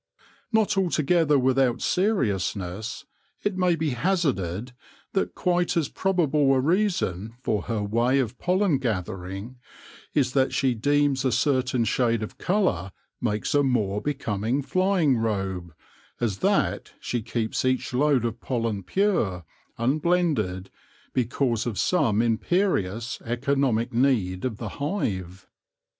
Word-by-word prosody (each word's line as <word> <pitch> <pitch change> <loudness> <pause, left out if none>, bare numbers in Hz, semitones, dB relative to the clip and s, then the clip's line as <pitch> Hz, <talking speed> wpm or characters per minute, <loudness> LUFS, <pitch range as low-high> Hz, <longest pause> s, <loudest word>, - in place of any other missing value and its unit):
Not 220 -3 +2
altogether 165 -3 +2
without 130 -1 +2
seriousness, 110 - -1 0.4
it 205 -2 0
may 180 -2 +2
be 160 -2 -1
hazarded 125 - -1 0.4
that 195 - -1
quite 175 -1 +1
as 160 -5 +1
probable 155 -7 +2
a - - +3
reason 135 - 0
for 105 -2 0
her 110 -3 -2
way 120 +6 +2
of 125 -2 -1
pollen 180 -5 +2
gathering 95 0 -4 0.6
is 130 -3 +2
that 135 -1 +2
she 130 -2 +2
deems 145 +2 +1
a 130 - +2
certain 130 -1 +1
shade 115 0 +1
of 110 - -8
colour 180 - 0 0.3
makes 105 -3 -1
a 145 - +4
more 105 -7 0
becoming 125 -2 -1
flying 185 -5 +2
robe, 95 -6 -2 0.5
as 105 -5 -1
that - - 0
she 120 - -2
keeps 115 0 -2
each 130 0 0
load 135 -2 +3
of 115 0 -3
pollen 115 -5 -2
pure, 100 - 0 0.3
un 130 +6 +1
blended, 145 - 0 0.4
because 120 -1 0
of 110 -5 -3
some 120 - +2
imperious, 115 - 0
economic 120 -1 0
need 115 -8 +1
of 115 -5 -2
the 110 -1 -5
hive. 95 - -3
125 Hz, 125 wpm, -25 LUFS, 110-150 Hz, 0.6 s, a